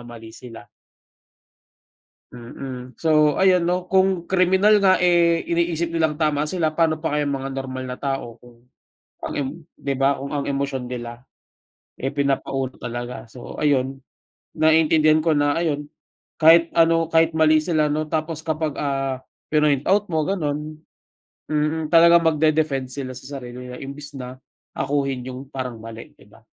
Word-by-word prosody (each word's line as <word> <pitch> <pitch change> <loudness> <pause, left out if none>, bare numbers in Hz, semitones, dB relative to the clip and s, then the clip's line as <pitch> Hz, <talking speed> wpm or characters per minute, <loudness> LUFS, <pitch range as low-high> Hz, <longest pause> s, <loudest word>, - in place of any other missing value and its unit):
mali 115 -2 -11
sila. 120 -2 -12 1.7
Mm. 125 +1 -9
So, 150 -2 +3
ayan 185 -2 +4
'no, 180 0 -1
kung 190 -2 +2
kriminal 190 +3 +3
nga, 190 -1 +5
eh, 170 -1 +3
iniisip 170 0 -1
nilang 160 -2 0
tama 150 -1 0
sila, 160 -4 -1
pa'no 160 -1 +2
pa 160 -1 -3
kaya 145 -1 0
mga 135 -1 -3
normal 130 -1 -5
na 125 0 -6
tao 135 -4 -4
kung 120 0 -19 0.6
ang - - -5
em 140 -2 -1 0.3
'di 140 - -3
ba, 140 0 +3
kung 140 +2 -6
ang 140 -1 -2
emosyon 135 -2 -3
nila, 120 -1 -7 0.8
eh, 135 - -1
pinapa-una 135 -2 -2
talaga. 120 0 -5
So, 120 +1 -10
ayun. 135 -2 +1 0.6
Naiintindihan 155 0 +4
ko 155 -1 +1
na 145 +2 +1
ayun, 150 -3 -2 0.5
kahit 165 +1 +6
ano, 165 0 +3
kahit 165 0 +3
mali 155 0 +4
sila 155 -2 0
'no, 155 +1 -1
tapos 155 0 -3
kapag, 155 -1 -2
ah, 135 -2 -2 0.3
pinoint 150 -3 +2
out 205 +1 +2
mo, 160 -4 0
gano'n 155 -4 -3 0.7
mm. 155 +1 -1
Talagang 170 0 +6
magde-defend 155 -4 +1
sila 130 -2 -6
sa 135 +3 -8
sarili 125 0 -9
nila 125 - -8
imbes 140 +1 -9
na 125 0 -7 0.4
akuin 135 -2 -1
yung 130 +2 -8
parang 130 -4 -6
mali, 115 0 -10
'di - - -19
ba? - - -20
150 Hz, 150 wpm, -22 LUFS, 130-160 Hz, 1.7 s, kahit